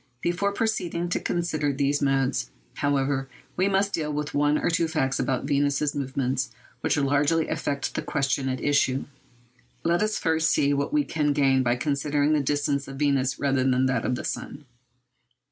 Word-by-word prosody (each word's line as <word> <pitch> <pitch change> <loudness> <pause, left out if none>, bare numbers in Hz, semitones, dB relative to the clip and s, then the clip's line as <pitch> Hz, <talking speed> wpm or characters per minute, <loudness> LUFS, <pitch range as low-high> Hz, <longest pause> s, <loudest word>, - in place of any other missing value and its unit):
Before 180 +4 0
proceeding 175 -6 -1
to - - 0
consider 155 -4 -1
those 140 +1 0
modes, 135 - +1 0.3
however, 140 -1 0 0.3
we 185 +2 +2
must 200 0 +1
deal 150 -2 -1
with 150 0 -3
one 145 +1 +2
or - - 0
two 165 0 +1
facts 135 -5 0
about 130 - 0
Venus's 145 0 +1
movements 130 -2 -1 0.3
which - - 0
largely 145 +3 +2
affect 140 0 -2
the - - -2
question 135 -1 -1
at 130 0 -2
issue. 135 -2 +1 0.8
Let 170 +1 +2
us 215 0 0
first 160 -1 +1
see 140 0 +2
what 140 - -1
we 300 -1 +2
gain 145 - +2
by 120 -1 +2
considering 145 +2 0
the 155 - +3
distance 145 0 0
of 135 - -7
Venus 135 -2 +1
rather 140 -2 +1
than 130 0 +2
that 130 0 0
of 125 - 0
the - - -5
sun. 145 +1 -5
145 Hz, 170 wpm, -26 LUFS, 135-160 Hz, 0.8 s, the